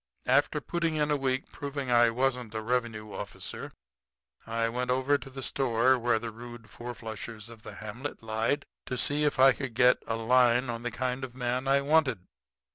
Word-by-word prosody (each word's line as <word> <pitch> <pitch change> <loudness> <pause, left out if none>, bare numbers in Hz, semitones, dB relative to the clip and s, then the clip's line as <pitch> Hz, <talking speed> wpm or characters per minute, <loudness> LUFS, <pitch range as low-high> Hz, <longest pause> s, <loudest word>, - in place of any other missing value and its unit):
"After - - +3
putting 170 -2 -1
in 150 -1 +1
a - - +4
week 130 -1 -1
proving 140 -2 -4
I 120 -1 +6
wasn't 125 -2 -1
a 110 - -2
revenue 115 -2 -2
officer, 100 - -6 0.8
I 115 0 0
went 125 +2 -2
over 130 +3 +2
to 135 - -10
the 135 0 -7
store 130 0 +2
where 120 -1 +2
the 115 0 -5
rude 120 -1 -11
fourflushers 115 -2 -7
of 115 -2 -12
the - - -9
hamlet 120 +5 -6
lied, 115 +6 0 0.2
to 125 - -3
see 145 +4 +3
if 145 - +1
I 135 +1 +8
could 130 -4 -6
get 125 +1 +5
a 115 - 0
line 125 +1 +3
on 115 0 -5
the 120 - -2
kind 125 +2 -2
of 125 -1 -6
man 125 +1 -1
I 140 +1 +4
wanted. 140 - +2
125 Hz, 190 wpm, -29 LUFS, 115-135 Hz, 0.8 s, I